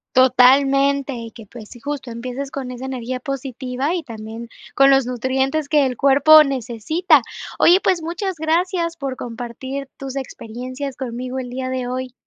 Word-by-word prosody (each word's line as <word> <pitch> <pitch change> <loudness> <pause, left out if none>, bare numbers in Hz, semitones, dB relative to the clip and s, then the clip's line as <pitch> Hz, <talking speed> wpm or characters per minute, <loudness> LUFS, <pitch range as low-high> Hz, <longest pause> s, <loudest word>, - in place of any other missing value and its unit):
Totalmente, 275 +2 +4
y 230 -1 -7
que, 225 -3 -13
pues, 220 -2 -11
sí, 240 - -12
justo 275 -2 -5
empieces 255 +4 -5
con 265 -2 -5
esa 250 +1 -7
energía 255 -1 -4
positiva 265 +2 -3
y 345 - -3
también 225 0 -8 0.3
con 275 0 +6
los 270 -2 +3
nutrientes 265 +4 -1
que 295 -3 +4
el 250 - -5
cuerpo 285 +3 +7
necesita. 270 - +1 0.4
Oye, 360 +2 +6
pues 355 -3 +1
muchas 350 +3 -3
gracias 335 +2 0
por 275 -5 -4
compartir 250 +3 -6
tus 270 -1 -7
experiencias 255 +1 -6
conmigo 255 0 -4
el 250 -1 -6
día 255 +1 -4
de 255 -1 -3
hoy. 255 0 -4
265 Hz, 160 wpm, -20 LUFS, 250-280 Hz, 0.4 s, cuerpo